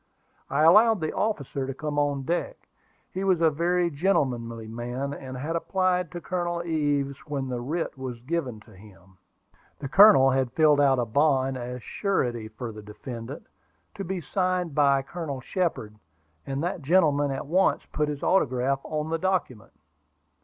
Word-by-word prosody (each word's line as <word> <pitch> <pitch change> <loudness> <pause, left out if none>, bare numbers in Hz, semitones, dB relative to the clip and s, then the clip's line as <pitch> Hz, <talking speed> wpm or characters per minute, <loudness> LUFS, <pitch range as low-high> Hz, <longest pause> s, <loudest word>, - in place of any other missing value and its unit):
I 140 +3 +1
allowed 210 +6 +6
the 155 -1 -2
officer 140 - -2
to 135 - -5
come 150 0 -2
on 145 -2 0
deck. 175 - -3 0.4
He 190 - -3
was 190 -3 +2
a 165 -1 +4
very 175 +3 +1
gentlemanly 125 - -1
man, 120 +5 -4
and 130 -2 -7
had 155 +6 -3
applied 180 0 0
to 175 - -6
Colonel 175 -1 -2
Ives 145 -4 -1
when 135 -3 -3
the 125 -1 -3
writ 160 +7 -3
was 125 -3 -5
given 130 -5 -3
to 110 -1 -18
him. 95 -2 -18 0.6
The 140 - -6
colonel 160 -5 +7
had 130 -2 0
filled 150 -2 +4
out 135 -2 +4
a 120 - 0
bond 135 +2 +2
as 125 -1 -6
surety 120 - -1
for 115 +2 -7
the 105 0 -10
defendant, 115 +5 -8 0.5
to 195 - -6
be 185 0 -4
signed 180 0 -1
by 140 -2 +3
Colonel 150 -2 -5
Shepard; 145 - -2 0.5
and 135 +2 -2
that 175 0 -2
gentleman 145 -2 +3
at 135 - -4
once 180 +6 +2
put 150 -1 0
his 145 -1 -5
autograph 135 -6 +2
on 155 0 -3
the 165 - 0
document. 175 - -2
145 Hz, 165 wpm, -26 LUFS, 130-175 Hz, 0.6 s, colonel